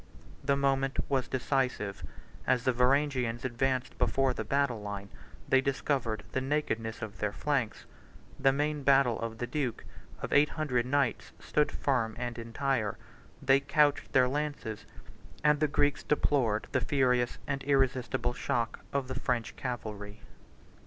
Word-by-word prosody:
The 140 0 +2
moment 135 -1 +1
was 130 -3 +1
decisive: 130 - -1 0.4
as 125 - +3
the 130 - +2
Varangians 125 -2 +1
advanced 130 +1 -1
before 135 -1 +2
the 110 - -4 0.4
line, 100 -1 -6 0.4
they 135 - +4
discovered 135 -4 -1
the 130 - -1
nakedness 120 -6 -1
of 105 -3 -7
their 105 -1 0
flanks: 135 -2 -1 0.5
the 135 - +5
main 150 +2 -1
battle 135 -4 +4
of 115 -1 -4
the 120 - -2
duke, 125 -1 -3 0.3
of - - -4
eight 145 +1 +5
hundred 125 -6 -1
knights, 135 -3 0
stood 150 0 +1
firm 120 -5 0
and 120 -1 -4
entire; 115 -2 -1 0.5
they 135 +1 +5
couched 145 +1 +2
their 125 - +5
lances, 145 -6 -3 0.6
and 150 -1 +4
the 155 - +3
Greeks 145 0 +1
bore 125 -7 +1
the - - +1
furious 125 -3 +2
and 140 -1 -2
irresistible 130 -2 +1
shock 120 -2 -1
of 140 -2 -1
the 130 - -4
French 120 -2 -1
cavalry. 105 -5 -5
130 Hz, 140 wpm, -30 LUFS, 115-140 Hz, 0.6 s, the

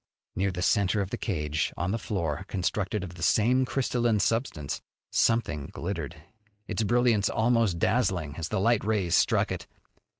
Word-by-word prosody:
Near 95 +1 +1
the 90 -1 -3
center 100 0 +2
of 100 0 -4
the 120 - -2
cage, 75 -7 -1
on 90 +3 -1
the 115 - -1
floor 85 -6 -2
constructed 95 +1 -1
of 90 -2 -7
the 85 - -11
same 125 +9 +3
crystalline 120 -3 +1
substance, 100 - -1 0.3
something 105 -12 +1
glittered, 85 -3 -5 0.5
its - - -2
brilliance 115 -2 +3
almost 115 -5 +2
dazzling 90 - 0
as 80 0 -3
the 105 - 0
light 115 +3 +2
rays 100 -5 0
struck - - +3
it. - - -5
100 Hz, 160 wpm, -28 LUFS, 85-115 Hz, 0.5 s, same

